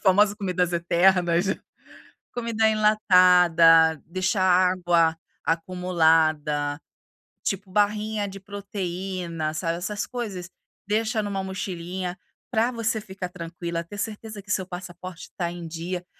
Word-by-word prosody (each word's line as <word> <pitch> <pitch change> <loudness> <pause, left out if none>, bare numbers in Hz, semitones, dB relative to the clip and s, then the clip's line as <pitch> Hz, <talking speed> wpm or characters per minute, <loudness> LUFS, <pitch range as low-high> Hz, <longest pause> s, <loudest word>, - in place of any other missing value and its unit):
famosas 205 +2 +4
comidas 180 -4 -1
eternas, 175 +1 +3 0.9
comida 230 -2 +1
enlatada, 180 -7 +5
deixar 185 +2 0
água 175 -3 +3 0.3
acumulada, 160 -4 +1 0.6
tipo 195 0 -2
barrinha 210 +1 +1
de 195 0 -9
proteína, 185 -5 -4
sabe, 165 +1 -2
essas 205 +4 -3
coisas, 205 -8 -5 0.4
deixa 220 +2 0
em 205 - -4
1 195 -1 -2
mochilinha, 185 -1 -4 0.3
para 230 +1 +2
você 225 -2 -1
ficar 190 -3 -7
tranquila, 170 -1 -5
ter 185 +5 -10
certeza 215 0 -5
que 200 0 -8
seu 190 -2 0
passaporte 180 -1 -8
está 170 -2 -3
em 175 -1 -7
dia, 175 +2 -5
185 Hz, 115 wpm, -25 LUFS, 170-205 Hz, 0.9 s, enlatada